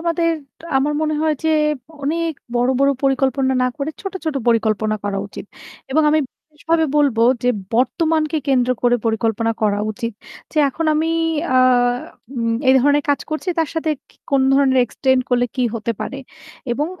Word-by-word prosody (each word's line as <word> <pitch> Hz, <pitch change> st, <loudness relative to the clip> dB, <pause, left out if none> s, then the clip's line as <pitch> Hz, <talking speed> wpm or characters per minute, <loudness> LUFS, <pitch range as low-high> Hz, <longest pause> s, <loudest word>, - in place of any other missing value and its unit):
আমাদের 335 Hz, 0 st, +1 dB, 0.5 s
আমার 285 Hz, +3 st, +1 dB
মনে 310 Hz, 0 st, 0 dB
হয় 315 Hz, -1 st, +2 dB
যে -, -, +2 dB, 0.5 s
অনেক 330 Hz, +3 st, -1 dB, 0.2 s
বড়, 245 Hz, +1 st, +2 dB
বড় 275 Hz, 0 st, +4 dB
পরিকল্পনা 270 Hz, -1 st, +1 dB
না 255 Hz, -, +2 dB
করে 290 Hz, +1 st, -3 dB
ছোট, 390 Hz, -, -5 dB
ছোট 315 Hz, -2 st, -1 dB
পরিকল্পনা 215 Hz, -2 st, +1 dB
করা 200 Hz, -1 st, -1 dB
উচিত। 200 Hz, -, -9 dB, 0.5 s
এবং 310 Hz, +4 st, +3 dB
আমি 310 Hz, -, +3 dB
বিশেষ 305 Hz, -1 st, -27 dB
ভাবে 330 Hz, -1 st, +4 dB
বলব 285 Hz, -6 st, +3 dB, 0.3 s
যে 245 Hz, -, +3 dB, 0.3 s
বর্তমানকে 315 Hz, +5 st, +1 dB
কেন্দ্র 255 Hz, -2 st, +2 dB
করে 245 Hz, 0 st, +4 dB
পরিকল্পনা 225 Hz, 0 st, 0 dB
করা 205 Hz, -1 st, +2 dB
উচিত। 230 Hz, +1 st, -4 dB, 0.4 s
যে 310 Hz, -, -1 dB
এখন 325 Hz, +5 st, -4 dB
আমি 320 Hz, +2 st, +1 dB, 0.5 s
আ -, -, +6 dB, 0.8 s
উম 230 Hz, -1 st, 0 dB
এই 260 Hz, -, +7 dB
ধরনের 290 Hz, +2 st, +3 dB
কাজ 285 Hz, -, +2 dB
করছি 310 Hz, +4 st, -3 dB
তার 325 Hz, -2 st, +1 dB
সাথে 320 Hz, -1 st, -1 dB, 0.2 s
কি -, -, -26 dB
কোন 275 Hz, -1 st, +3 dB
ধরনের 270 Hz, -1 st, +3 dB
এক্সটেন্ড 260 Hz, +2 st, +1 dB
করলে 245 Hz, 0 st, +2 dB
কি 255 Hz, -, +1 dB
হতে 230 Hz, +1 st, -2 dB
পারে। 275 Hz, -, -4 dB, 0.5 s
এবং 290 Hz, +5 st, -1 dB
270 Hz, 170 wpm, -19 LUFS, 240-310 Hz, 0.8 s, এই